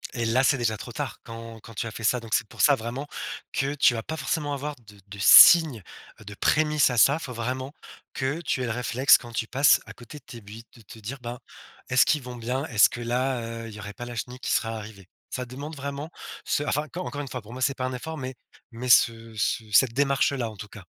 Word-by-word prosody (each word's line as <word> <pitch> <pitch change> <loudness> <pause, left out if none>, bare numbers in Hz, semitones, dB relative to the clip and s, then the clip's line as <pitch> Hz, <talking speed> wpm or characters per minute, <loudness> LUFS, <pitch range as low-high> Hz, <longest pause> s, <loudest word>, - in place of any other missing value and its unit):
Et 120 -2 -1
là, 120 +4 +2
c'est 135 0 +3
déjà 110 -2 0
trop - - -9
tard - - -5
quand 115 0 -9
quand, 115 - -13
tu 115 - -4
as - - -6
fait 115 - -9
ça, 125 +4 +2
donc 115 -1 -2
c'est 115 - 0
pour - - -6
ça, 145 - +6
vraiment, 125 +4 -6 0.4
que 140 +1 -1
tu 135 -4 +3
vas 115 - -4
pas 160 - -5
forcément 150 -2 -2
avoir 145 +1 -4
de 105 -1 -15
de 100 0 -10
signes, 150 - +8 0.4
heu, - - -14
de 105 +1 -9
prémices 150 +2 +2
à 125 - -3
ça, 140 +6 +5
faut 160 -6 -7
vraiment 130 +4 -4 0.4
que 135 +4 -2
tu 130 - -2
aies - - -1
le 115 - -2
réflexe 125 +3 +4
quand 120 - -12
tu 110 -1 -3
passes 135 +3 +4
à - - -9
côté 125 +5 -12
de - - -36
tes 120 -3 -11
buis 110 +3 -12
de 120 - -16
te 110 +2 -13
dire: 115 +6 -6
«Ben, 120 0 -6 0.5
est-ce 130 -1 +5
qu'ils 150 - +1
vont 125 -1 -8
bien, 125 +4 -3
est-ce 110 -9 +5
que 120 - -7
là, 125 +1 -1
heu, 115 0 -6
il - - -11
y 105 - -10
aurait 100 0 -8
pas 120 - -8
la 120 - -8
chenille 125 +3 -6
qui - - -3
serait 115 - +1
arrivée?», 105 -4 -8 0.2
ça 125 - -4
demande 140 +5 -8
vraiment 140 +3 -6 0.3
ce - - 0
enfin, 145 +1 -1
enc 155 +2 -11
encore 145 -5 -4
une 145 - -7
fois, 125 -1 -6
pour 105 +3 -13
moi, 130 - -8
c'est 140 - +2
pas 130 - -2
un 130 - -3
effort, 160 +6 -6
mais 130 0 -6 0.4
mais 120 +2 -6
ce 115 -1 +4
ce 110 +1 -1
cette 115 +3 +4
démarche-là, 135 -2 +1
en 105 - -14
tout 105 - -8
cas. 100 -1 -13
125 Hz, 260 wpm, -25 LUFS, 115-140 Hz, 0.5 s, signes